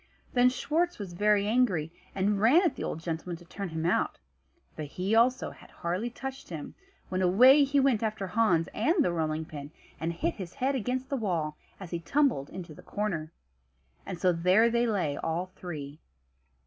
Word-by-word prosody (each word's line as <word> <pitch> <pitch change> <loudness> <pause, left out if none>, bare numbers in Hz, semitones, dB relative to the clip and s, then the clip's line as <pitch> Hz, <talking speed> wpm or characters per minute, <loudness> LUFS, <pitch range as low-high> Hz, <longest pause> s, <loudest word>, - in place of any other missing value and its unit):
Then 245 0 +5
Schwartz 335 +7 0
was 195 -4 -7
very 205 +2 +3
angry, 205 -10 +2 0.2
and 200 +1 +1
ran 275 - +6
at 325 -7 +1
the - - -5
old 160 - -4
gentleman 170 +1 -4
to 175 - -16
turn 195 +2 -6
him 160 0 -3
out; 170 - +1 0.6
but 155 - -4
he 185 +8 -2
also 245 +3 +3
had - - -16
hardly 180 +7 -3
touched 270 +3 -7
him, 160 -4 -6 0.4
when 185 0 -1
away 250 +11 +7
he 280 +1 +2
went 265 -5 +3
after 215 -3 -2
Hans 185 -5 +2
and 310 - +2
the - - +2
rolling 160 -1 -1
pin, 145 -3 -8 0.3
and 165 +1 -1
hit 170 0 -1
his 180 -3 -7
head 270 +1 0
against 255 +1 -2
the 275 - -1
wall 170 -9 -1 0.2
as 190 -4 -9
he 170 - -2
tumbled 260 - +1
into 175 -3 -8
the - - -13
corner. 170 -7 -3 0.7
And 180 - -6
so 180 -2 +3
there 185 +7 +4
they 235 +1 +2
lay, 175 -10 0
all 175 +3 -2
three. 150 -4 -7
190 Hz, 185 wpm, -29 LUFS, 165-245 Hz, 0.7 s, away